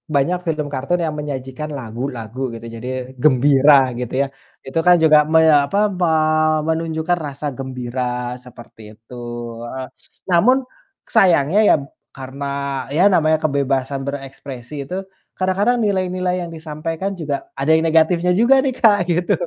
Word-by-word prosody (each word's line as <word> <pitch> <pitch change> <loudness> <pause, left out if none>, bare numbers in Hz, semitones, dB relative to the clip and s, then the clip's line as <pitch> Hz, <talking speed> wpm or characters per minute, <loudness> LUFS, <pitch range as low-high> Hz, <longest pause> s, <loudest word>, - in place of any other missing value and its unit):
banyak 175 +6 +1
film 155 -2 -1
kartun 140 +7 -1
yang 155 -2 -2
menyajikan 140 0 -5
lagu-lagu 120 0 -6
gitu 115 0 -9
jadi 115 +2 -7 0.4
gembira 140 -1 +5
gitu 125 -1 -5
ya. - - -3 0.4
Itu 135 +5 -1
kan 180 - +8
juga 155 -1 +6 0.2
meya 155 -3 +5
apa, 200 - -2 0.2
me 175 - +2 0.6
menunjukkan 160 +1 -1
rasa 140 +1 -7
gembira 125 -1 -4
seperti 120 -2 -15 0.2
itu 115 +3 -14 0.5
heeh. 130 -1 -6 0.4
Namun 250 +10 +4 0.5
sayangnya 180 -3 +4
ya - - +6 0.4
karena 135 +1 -7 0.4
ya 155 +6 +2
namanya 155 -2 +3
kebebasan 140 -2 -1
berekspresi 135 -1 -7
itu, 185 - -3 0.4
kadang-kadang 195 +6 +1
nilai-nilai 185 -4 -1
yang 170 - -5
disampaikan 165 +3 -5
juga 150 -6 -4
ada 135 +3 -3
negatifnya 165 +2 +2
juga 235 +8 +4
nih 265 - 0
Kak, 210 -5 +4
gitu. 175 0 +1
150 Hz, 135 wpm, -19 LUFS, 135-175 Hz, 0.6 s, kan